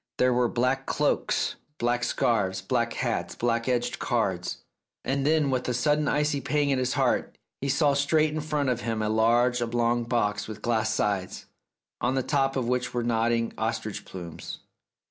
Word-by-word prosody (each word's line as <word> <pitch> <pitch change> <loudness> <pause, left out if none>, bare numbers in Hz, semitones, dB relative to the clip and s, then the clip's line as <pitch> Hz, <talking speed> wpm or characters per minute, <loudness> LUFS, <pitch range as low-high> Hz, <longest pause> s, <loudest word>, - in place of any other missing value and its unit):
There 125 0 +3
were 120 0 +3
black 125 +2 0
cloaks, - - 0 0.2
black 120 -1 0
scarves, 100 -7 +1
black 115 +4 0
hats, 115 -9 -2
black 115 +1 0
edged 120 -1 0
cards.... - - -1 0.4
And 140 +1 0
then, 155 -3 +3
with 130 -1 -1
a 125 - 0
sudden 150 +4 +2
icy 150 -1 +1
pang 145 -1 +1
at 135 - +2
his 130 0 0
heart, - - 0 0.2
he 140 - -1
saw 140 +1 +3
straight 150 +2 +2
in 155 - -2
front 150 -2 -1
of 120 -1 0
him 110 -1 -2
a 105 - 0
large 120 +3 +3
oblong 120 0 +1
box 105 -4 0
with 110 -1 -8
glass 110 -2 +1
sides, 100 -4 -1 0.6
on 125 +2 +1
the 130 - +1
top 135 -1 +1
of 130 -3 -1
which 125 0 -1
were 120 - 0
nodding 115 0 +1
ostrich 110 -2 -2
plumes. 85 -3 -8
120 Hz, 175 wpm, -27 LUFS, 115-135 Hz, 0.6 s, There